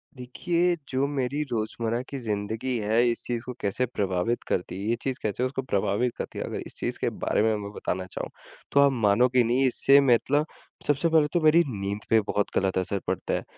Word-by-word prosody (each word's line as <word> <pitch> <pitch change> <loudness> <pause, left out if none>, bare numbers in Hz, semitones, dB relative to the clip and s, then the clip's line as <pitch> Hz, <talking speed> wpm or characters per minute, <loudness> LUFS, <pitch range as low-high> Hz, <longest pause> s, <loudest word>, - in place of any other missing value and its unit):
देखिए, 170 +8 0
जो 135 +1 +1
मेरी 140 0 -2
रोज़मर्रा 115 +1 -1
की 140 - -5
ज़िंदगी 110 +3 -2
है 110 +3 +2
इस 115 - -3
चीज़ 120 -1 -2
को 125 - -5
कैसे 100 +5 0
प्रभावित 100 -1 -1
करती 90 +1 -2
है 105 - -2
ये 115 - +2
चीज़ 130 -2 -2
कैसे 110 +3 -1
उसको 130 +1 -1
प्रभावित 105 0 0
करती - - -5
है - - -2
अगर - - -4
इस - - -13
चीज़ - - -3
के - - 0 0.2
बारे - - +2
में 110 0 +2
मैं 100 - -6
बताना 95 -2 -3
चाहूँ। - - -5 0.4
तो 140 - +4
आप 140 0 +6
मानोगे 120 +2 +3
नहीं 125 +4 +2
इससे 135 +2 +5
मतलब 140 +3 +3 0.4
सबसे 145 +3 +2
पहले 160 -2 +4
तो 175 - +3
मेरी 155 +2 +6
नींद 100 -4 -3
पे 110 - +5
बहुत 105 0 -1
गलत 95 -1 +1
असर 95 +2 -1
पड़ता 95 -1 -2
है। - - -1
120 Hz, 210 wpm, -26 LUFS, 105-135 Hz, 0.4 s, आप